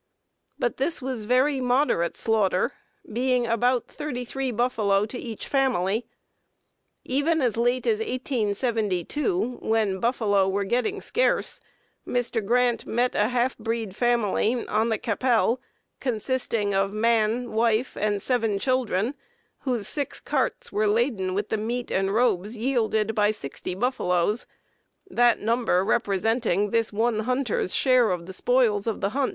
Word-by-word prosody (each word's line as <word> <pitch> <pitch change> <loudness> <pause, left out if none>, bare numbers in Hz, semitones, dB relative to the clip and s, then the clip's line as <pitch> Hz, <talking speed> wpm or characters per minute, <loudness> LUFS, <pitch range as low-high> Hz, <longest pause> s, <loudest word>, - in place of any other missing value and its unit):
But 240 - -1
this 290 +5 0
was 255 -5 -4
very 260 +4 +2
moderate 250 - +1
slaughter, 210 -5 +1 0.4
being 250 +1 +1
about 245 +2 +1
33 270 -2 -4
buffalo 215 -4 +1
to 245 +3 -7
each 225 -3 -6
family. 245 -6 +1 1.0
Even 290 +5 +1
as 245 -6 +1
late 245 +2 +1
as 435 -2 +2
1872, 245 - -1
when 215 -4 0
buffalo 205 -4 +2
were 200 +1 0
getting 250 - -1
scarce, - - +1 0.5
Mr. 245 -2 -1
Grant 240 +2 +1
met 245 +2 +1
a 210 - +2
half 250 +1 0
breed 225 -4 -3
family 240 0 +1
on 220 +2 +1
the 220 - +1
Qu'Appelle, 240 +2 +1 0.4
consisting 230 -3 -1
of 195 0 +1
man, 230 +2 +1
wife, 230 +2 +1
and 205 -1 -1
seven 225 -5 +1
children, 245 -1 0 0.5
whose 245 -7 -1
six 285 -2 0
carts - - -2
were 215 0 +1
laden 210 -4 0
with 205 +1 -2
the 220 - 0
meat 235 +3 -3
and 195 0 +1
robes 215 -1 +1
yielded 220 -3 0
by 210 -1 +3
sixty 180 -2 -5
buffaloes; 205 -3 0 0.6
that 240 - +3
number 220 -4 +1
representing 210 -1 +1
this 230 -1 +1
one 220 +1 0
hunter's 250 -4 0
share 255 -4 +4
of 175 -2 -2
the 190 - -8
spoils 230 -1 +2
of 225 - -1
the 195 - +1
hunt. 270 +4 0
230 Hz, 135 wpm, -25 LUFS, 210-250 Hz, 1.0 s, share